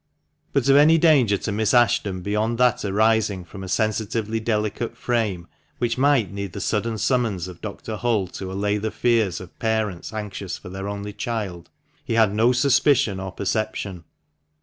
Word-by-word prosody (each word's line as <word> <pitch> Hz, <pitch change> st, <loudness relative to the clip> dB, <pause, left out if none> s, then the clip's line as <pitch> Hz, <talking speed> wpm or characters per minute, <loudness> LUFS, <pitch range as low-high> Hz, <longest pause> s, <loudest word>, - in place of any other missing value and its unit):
But -, -, +1 dB
of 135 Hz, -, +6 dB
any 155 Hz, +3 st, +6 dB
danger 140 Hz, -11 st, +4 dB
to 105 Hz, -, -4 dB
Miss 110 Hz, +3 st, +1 dB
Ashton 105 Hz, -6 st, +2 dB
beyond 105 Hz, +4 st, 0 dB
that 125 Hz, -1 st, +2 dB
arising 105 Hz, -2 st, +1 dB
from 95 Hz, +3 st, -9 dB
a -, -, -6 dB
sensitively 110 Hz, +1 st, -1 dB
delicate 110 Hz, 0 st, -2 dB
frame, 105 Hz, -8 st, -1 dB, 0.3 s
which 120 Hz, -1 st, 0 dB
might 130 Hz, -6 st, +2 dB
need 100 Hz, -2 st, -5 dB
the -, -, -5 dB
sudden 110 Hz, +1 st, -1 dB
summons 110 Hz, -5 st, 0 dB
of 90 Hz, -2 st, -11 dB
Dr. 110 Hz, +1 st, -6 dB
Hull 115 Hz, -4 st, +1 dB
to 95 Hz, 0 st, -7 dB
allay 105 Hz, +2 st, 0 dB
the 110 Hz, +2 st, -2 dB
fears 115 Hz, -6 st, +1 dB
of 90 Hz, -1 st, -13 dB
parents 110 Hz, -5 st, -1 dB
anxious 105 Hz, -3 st, -5 dB
for 95 Hz, -, -11 dB
their 95 Hz, +1 st, -6 dB
only 100 Hz, 0 st, -5 dB
child, 100 Hz, -8 st, -4 dB, 0.3 s
he -, -, -3 dB
had 110 Hz, -3 st, +4 dB
no 115 Hz, +3 st, +4 dB
suspicion 125 Hz, -5 st, +3 dB
or 95 Hz, 0 st, -5 dB
perception. 100 Hz, -2 st, -3 dB
110 Hz, 170 wpm, -23 LUFS, 100-115 Hz, 0.3 s, of